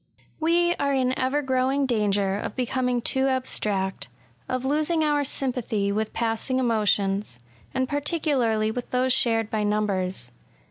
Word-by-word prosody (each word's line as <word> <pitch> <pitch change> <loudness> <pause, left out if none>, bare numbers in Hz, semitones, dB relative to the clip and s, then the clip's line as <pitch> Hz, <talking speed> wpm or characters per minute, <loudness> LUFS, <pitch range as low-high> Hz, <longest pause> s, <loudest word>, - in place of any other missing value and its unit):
We 345 +2 +3
are 280 -1 0
in 255 -1 +1
ever 270 +3 0
growing 265 +1 +1
danger 205 -5 +1
of 205 - -4
becoming 250 -1 -1
too 265 0 +2
abstract, 210 - -1 0.2
— 115 +1 -35
of 255 0 -2
losing 310 +3 +1
our 295 -1 +2
sjrmpathy 240 -7 -1
with 215 +1 -1
passing 230 +3 -1
emotions, 205 - +1 0.2
— 110 0 -30
and 260 - +1
particularly 280 -7 0
with 245 +2 -5
those 255 0 +2
shared 225 -3 +2
by 215 - 0
numbers. 205 -3 -1
250 Hz, 145 wpm, -25 LUFS, 210-270 Hz, 0.2 s, We